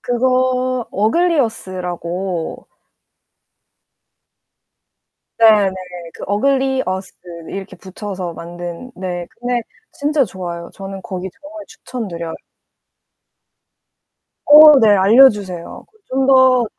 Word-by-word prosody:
그거 255 0 0
어글리어스라고. 190 - -2 2.7
네, 215 -3 +5
네, - - -10 0.4
그 - - -10
어글리어스 260 -3 -1 0.4
이렇게 195 0 -7
붙여서 190 -2 -7
만든 175 +7 -8
네 180 -2 -5
근데 245 0 -1 0.3
진짜 290 -1 +1
좋아요. 175 -4 -7
저는 195 0 -8
거기 185 0 -6
정말 310 +2 -10
추천드려요. 170 -10 -7 2.1
어 300 0 +9
네. 220 -3 +4
알려주세요. 200 -3 +3 0.2
좀 265 +1 0
더 260 -2 +5
210 Hz, 190 characters per minute, -18 LUFS, 185-255 Hz, 2.7 s, 어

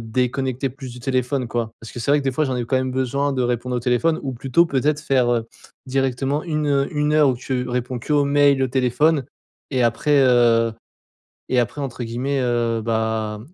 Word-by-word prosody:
déconnecter 130 +3 -1
plus 135 -1 -9
du 125 - -11
téléphone 130 0 -1
quoi. 115 -1 -2
Parce 115 - -10
que 120 - -7
c'est 130 - -1
vrai 145 - +5
que - - -8
des 135 - 0
fois 155 +4 0
j'en 130 - -2
ai 120 - -2
quand 130 +3 0
même 130 0 -1
besoin 135 +2 0
de 130 - 0
répondre 125 +1 -1
au - - -1
téléphone 125 +7 +1
ou 135 -2 -3
plutôt 135 +7 +2
peut-être 145 +1 0
faire, 130 -4 +2
heu, 115 -2 0 0.4
directement 135 +2 -1
une 150 -4 0
1 150 0 0
heure 150 -2 +5
où 130 - +1
tu 125 0 -3
réponds 125 0 -2
qu'aux 145 +3 +1
mails 140 -1 +3
et - - +2
au - - -2
téléphone. 130 +3 +2 0.5
Et 130 -2 +1
après, 145 +6 +2
heu, 120 -2 +4 0.8
et 125 - +3
après 120 +4 -2
entre 130 -3 -5
guillemets, 130 +5 -2
heu, 120 -2 0
bah, 110 -1 -1
130 Hz, 210 wpm, -21 LUFS, 120-140 Hz, 0.8 s, vrai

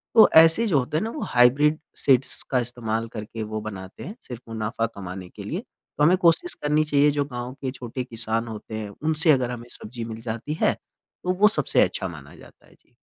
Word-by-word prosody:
तो 225 - +9
ऐसे 165 +8 +7
जो 150 -8 +3
होते 130 +5 -2
हैं 200 - 0
ना, 225 - -2
वो 300 - -6
हाइब्रिड 140 +6 +4 0.2
सीड्स 135 -1 +2
का 130 - +3
इस्तेमाल 115 -2 -3
करके 110 0 -6
वो 110 0 -4
बनाते 95 -3 -8
हैं 200 - -7
सिर्फ़ 125 -1 -7
मुनाफ़ा 115 +1 -2
कमाने 95 -2 -7
के - - -10
लिए। - - -3
तो 150 - -6
हमें 180 +4 +5
कोशिश 180 - +3
करनी 150 +1 +3
चाहिए 145 -1 +3
जो 145 0 0
गाँव 125 -1 -6
के 130 - -2
छोटे 130 0 -6
किसान 115 -1 -2
होते 110 0 -7
हैं, 105 -1 -5
उनसे 155 - +2
अगर 125 -3 +2
हमें 120 -1 -7
सब्ज़ी 115 +2 -8
मिल 115 0 -7
जाती 115 +6 -4
है, - - +4 0.5
तो 180 - +1
वो 210 - +9
सबसे - - +2
अच्छा - - 0
माना - - -11
जाता - - -17
है। - - -21
जी। - - -35
125 Hz, 215 wpm, -24 LUFS, 110-150 Hz, 0.5 s, तो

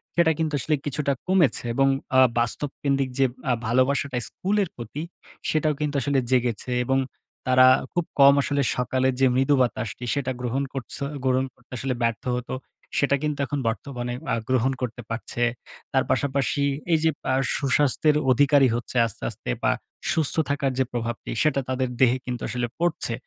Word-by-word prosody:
সেটা 170 -2 +4
কিন্তু 160 -2 -1
আসলে 155 +5 +1
কিছুটা 140 0 0
কমেছে। 180 -9 +3
এবং 135 +2 +3 0.3
আ - - +8 0.2
বাস্তবকেন্দ্রিক 135 +2 -1
যে 135 - +5 0.2
আ - - +4
ভালোবাসাটা 130 +3 +1
স্কুলের 200 -1 -1
প্রতি, 120 +5 -6 0.5
সেটাও 155 -1 +2
কিন্তু 145 -1 -1
আসলে 140 +1 +1
জেগেছে 125 -1 0
এবং 135 +1 +2 0.5
তারা 130 0 +6 0.3
খুব 175 -2 0
কম 140 0 +9
আসলে 140 0 0 0.2
সকালের 130 +1 +1
যে 130 - +6
মৃদু 135 +2 +3
বাতাসটি, 120 0 -2
সেটা 130 -2 -1
গ্রহণ 125 +3 -1
করছে 135 +1 -6 0.2
গ্রহণ 130 0 +2
করতে 125 - -31
আসলে 130 +1 -2
ব্যর্থ 115 -1 0
হতো, 125 - -5 0.4
সেটাকে 140 0 +2
কিন্তু 150 -1 -2
এখন 145 0 -3
বর্তমানে 120 +1 -3 0.2
আ - - +3
গ্রহণ 130 +1 +2
করতে 120 0 -4
পারছে। 120 +1 -3 0.5
তার - - +3
পাশাপাশি 140 0 0 0.3
এইযে 160 0 +3 0.2
আ - - +2 0.2
সুস্বাস্থ্যের 145 +2 +2 0.2
অধিকারী 140 +1 +5
হচ্ছে 120 +1 -5
আস্তে, 115 - -7
আস্তে - - -8
বা, - - +4 0.4
সুস্থ 155 -4 +1
থাকার 140 -2 0
যে 130 - +5
প্রভাবটি, 120 -1 -4
সেটা 150 -2 +2
তাদের 130 0 0
দেহে 130 -1 +4
কিন্তু 125 -2 -4
আসলে 125 -1 -2
পড়ছে। 170 -8 0
135 Hz, 160 wpm, -24 LUFS, 125-145 Hz, 0.5 s, কম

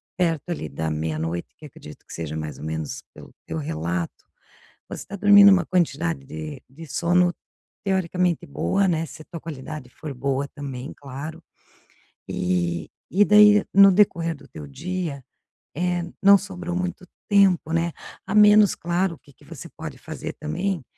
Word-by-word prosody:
perto 170 -2 0
ali 170 - -3
da 80 0 -3
meia-noite, 80 +2 -3
que 155 - -13
acredito 75 - -13
que - - -12
seja 80 -2 -5
mais 75 -1 -5
ou - - -10
menos 80 -1 -4
pelo - - -13
teu 80 - -5
relato, 80 +3 -3 0.6
você - - -7
está 200 - -8
dormindo 205 0 +8
uma 185 -3 +4
quantidade 165 -3 0
de 80 - -7
de 160 +5 -11
sono, 175 +4 +2 0.5
teoricamente, 180 -3 0
boa, 85 - 0
né, 165 -2 0
se 160 - -11
a - - -28
tua 170 -1 -8
qualidade 150 -3 -7
for 150 +2 -8
boa 135 +2 -1
também, 140 -2 -7
claro. 145 +4 -8 0.8
E 85 -2 -1 0.2
e 205 +3 +5
daí, 210 0 +7
no 195 0 +8
decorrer 170 -4 +2
do 145 -1 -16
teu 75 -2 -10
dia, 160 - -4 0.5
eh, 175 +2 0 0.2
não 200 +1 +8
sobrou 180 -3 -6
muito 180 +1 -3 0.2
tempo, 195 -5 +4
né, 165 +1 +1 0.3
a - - -4
menos, 210 -1 +7
claro 175 +2 -1
o - - -23
que 145 - -20
que 145 - -22
você 165 +2 -10
pode 155 -4 -7
fazer 160 +2 -6
também, 175 +2 -3
160 Hz, 165 wpm, -24 LUFS, 125-180 Hz, 0.8 s, dormindo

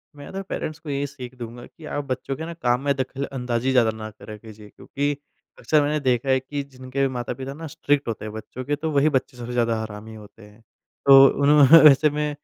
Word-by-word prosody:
मैं 145 -1 -11
तो 195 - -4
पेरेंट्स 155 0 -4
को 155 - -10
यही 140 0 -1
सीख 130 -2 -10
दूँगा 120 0 -9
कि 160 - -15
आप 145 - -2
बच्चों 130 +1 -4
के 160 - -6
ना 170 - -6
काम 125 -6 0
में 140 - +3
दखल 135 +1 -4
अंदाजी 125 -1 -2
ज़्यादा 120 -4 +3
ना 110 0 -7
करा 105 +1 -11
कीजिए, 105 -1 -14
क्योंकि 145 +7 -3 0.5
अक्सर 155 -1 +2
मैंने 150 +1 0
देखा 130 -1 0
है 130 0 +3
कि 140 +2 -5
जिनके 130 +1 -5
भी 135 - +3
माता-पिता 125 +2 -5
ना 160 +3 -8
स्ट्रिक्ट 145 -1 -1
होते 110 -2 -4
हैं 105 - -7
बच्चों 110 +4 -8
के 145 +2 0
तो 155 +2 -4
वही 145 +1 +3
बच्चे 130 -1 -2
सबसे 120 0 -7
ज़्यादा 115 -2 0
हरामी 110 0 -8
होते 105 +1 -14
हैं। 105 +2 -18 0.4
तो 135 0 +9 0.2
उन्होंने 145 +2 +7
वैसे 150 +2 +4
में 150 +1 -2
130 Hz, 225 wpm, -23 LUFS, 120-145 Hz, 0.5 s, तो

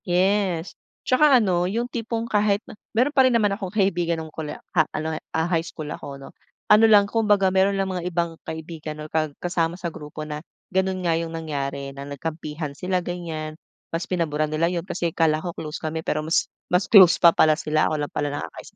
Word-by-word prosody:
Yes. 185 -1 +1 0.3
'Tsaka 275 +1 +5
ano, 180 -3 +1
'yong 230 +5 -1
tipong 230 -1 -3
kahit 205 -1 +2
na - - -11 0.2
meron 250 +6 +2
pa 275 - +5
rin 255 - +3
naman 210 -4 +3
akong 195 -2 -4
kaibigan 175 -5 +1
no'ng 160 -1 -10
kole 155 -2 -5
ah, 155 -3 0
ano, 160 +1 -2
eh, - - -9
ah, 160 0 +1
high 165 -2 +2
school 155 -3 -7
ako, 140 -1 -8
'no. 135 - -10 0.4
Ano 210 +2 +8
lang, 205 -2 +7
kumbaga 205 -4 +3
meron 190 +1 +3
lang 195 0 0
mga 180 -2 -4
ibang 170 -1 -1
kaibigan 160 -1 -6
or 155 - -8
ka 155 -1 +1
kasama 170 -1 0
sa 175 -2 -4
grupo 150 0 -8
na 150 0 -5 0.3
gano'n 190 0 0
nga 170 - +3
'yong 165 0 -3
nangyari 140 -4 -4
na 140 0 -8
nagkampihan 155 +1 -5
sila, 180 +5 -1
ganiyan, 165 -3 -5 0.4
mas 165 - -1
pinaburan 155 -4 0
nila 160 +3 +1
'yon 170 -1 -3
kasi 170 -1 -2
akala 160 -2 +2
ko 175 - -4
close 155 -1 -5
kami 160 +1 -3
pero 155 0 -1
mas 160 - +1 0.2
mas 180 +1 +2
close 190 -5 +8
pa 170 - +9
pala 155 - +5
sila, 155 0 +1
ako 155 -1 -1
lang - - -13
pala 145 - -1
nakakaisip - - -10
170 Hz, 210 wpm, -24 LUFS, 155-195 Hz, 0.4 s, pa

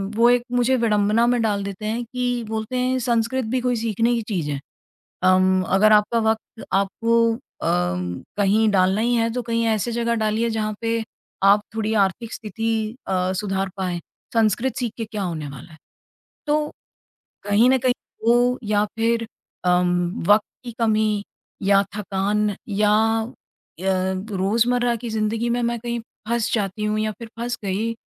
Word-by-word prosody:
वो 235 +1 +5
एक 245 0 +4
मुझे 245 +1 +2
विडंबना 215 0 +2
में 245 -1 +2
डाल 205 -3 0
देते 200 +1 -6
हैं 230 +3 -1
कि 245 0 -2
बोलते 220 +3 -3
हैं, 255 +1 +1
"संस्कृत 240 +1 0
भी 255 - +2
कोई 250 0 +1
सीखने 230 +1 +1
की 230 - -1
चीज़ 170 -9 -2
है? 140 - -3 0.6
अम, 185 0 +4
अगर 205 +3 +4
आपका 210 +2 +3
वक़्त 220 0 -1
अम, - - -9
आपको 230 +3 +1 1.0
कहीं 210 +2 +3
डालना 190 +2 +3
ही 240 +2 +2
है 230 0 +2
तो 250 - -1
कहीं 230 -1 -1
ऐसी 220 +1 0
जगह 235 0 0
डालिए 220 +1 0
जहाँ 215 -1 -1
पे, 230 0 0 0.4
आप 200 +1 +6
थोड़ी 220 0 -1
आर्थिक 225 +4 -5
स्थिति 225 +1 -3 0.4
अ, 185 0 0
सुधार 195 -1 -2
पाएँ। 180 -2 -2 0.3
संस्कृत 225 +3 +2
सीख 240 -3 -2
के 225 - -3
क्या 210 -2 -4
होने 160 -5 -3
वाला 140 +4 -11
है?" 160 - -14 0.7
तो 300 0 +1 0.8
कहीं 210 +5 +5
न 265 - +5
कहीं 250 0 +2 0.3
वो 245 +1 +4
या 210 -1 +2
फिर 230 0 +1 0.4
अम, 180 +1 +1
वक़्त 210 +1 +5 0.2
की 240 - -6
कमी, 215 -2 +2 0.4
या 195 0 +4
थकान 205 0 0
या 210 +1 +2 0.3
अ, 225 - -8 0.5
रोज़मर्रा 200 +6 +1
की 235 0 -6
जिंदगी 220 +2 -1
में 240 +1 0
मैं 235 0 -1
कहीं 235 0 -3 0.3
फँस 235 -1 0
जाती 210 -1 -1
हूँ 215 0 0
या 215 0 0
फिर 230 - -7
फँस 240 0 -2
गई, 210 +4 -1
220 Hz, 165 wpm, -22 LUFS, 200-235 Hz, 1.0 s, आप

